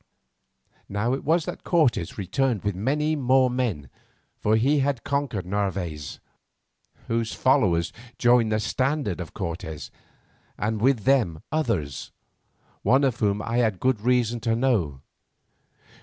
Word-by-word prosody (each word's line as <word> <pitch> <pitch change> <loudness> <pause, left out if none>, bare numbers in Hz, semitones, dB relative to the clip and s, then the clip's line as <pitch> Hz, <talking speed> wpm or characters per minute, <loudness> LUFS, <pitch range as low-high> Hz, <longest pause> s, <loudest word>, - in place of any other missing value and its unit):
Now 105 +5 0
it 135 - -3
was 160 +2 +2
that - - -6
Cortes 130 - +1
returned 110 +3 0
with 100 -1 0
many 150 - 0
more 130 -2 +3
men, 115 - -2 0.5
for 105 +1 +1
he 140 +7 +3
had 135 -3 0
conquered 140 -9 -2
Narvaez, 90 -6 -3 0.9
whose 115 -1 -1
followers 90 -10 +2 0.2
joined 120 -2 +4
the 110 - +2
standard 130 - -1
of 85 - -9
Cortes, 85 -4 -5 0.7
and 105 0 -2
with 130 -1 +3
them 105 - +2
others, 110 - -2 0.7
one 135 +3 +3
of 130 -4 +1
whom 105 0 +1
I 115 +1 -2
had 110 -6 +1
good 130 -5 +1
reason 120 0 +1
to 115 0 0
know. 105 - 0
115 Hz, 130 wpm, -25 LUFS, 100-130 Hz, 0.9 s, joined